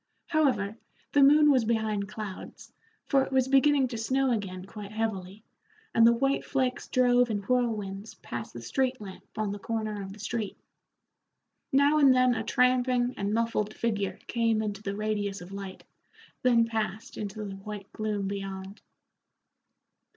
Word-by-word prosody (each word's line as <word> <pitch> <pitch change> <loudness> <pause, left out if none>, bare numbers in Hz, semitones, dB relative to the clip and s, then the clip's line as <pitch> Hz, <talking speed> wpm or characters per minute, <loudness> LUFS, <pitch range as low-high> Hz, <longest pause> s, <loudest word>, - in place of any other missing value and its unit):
However, 245 -10 +1 0.3
the 285 - +4
moon 295 +2 +7
was 260 -4 +4
behind 215 -3 -1
clouds, 205 -2 -8 0.3
for 275 -2 +3
it - - -6
was 260 -1 +2
beginning 275 0 +4
to 230 -2 -5
snow 265 +3 +1
again 190 -5 -3
quite 205 0 -9
heavily, 215 -2 -3 0.5
and 230 0 +6
the - - +7
white 270 +4 +1
flakes 260 -2 -1
drove 245 -1 +3
in 205 -2 -2
whirlwinds 215 -4 -1
past 120 -1 -7
the 120 - -9
street 260 - 0
lamp 195 -3 -9
on 215 -2 -1
the 205 - -5
corner 215 -1 -3
of 195 0 -7
the 200 - -11
street. 220 -1 -3 1.1
Now 285 +3 +4
and 275 -3 +6
then 255 -1 +4
a 235 - -2
tramping 250 0 +2
and 200 0 -2
muffled 220 -1 0
figure 205 -4 -1
came 230 -2 +1
into 205 -1 -4
the 200 -1 -4
radius 205 -1 -2
of 180 +2 -11
light, 195 -1 -7 0.6
then 235 -2 +4
passed 220 -1 -3
into 205 0 -5
the 195 -1 -6
white 200 0 -8
gloom 210 -2 -2
beyond. 195 0 -6
220 Hz, 160 wpm, -28 LUFS, 200-250 Hz, 1.1 s, moon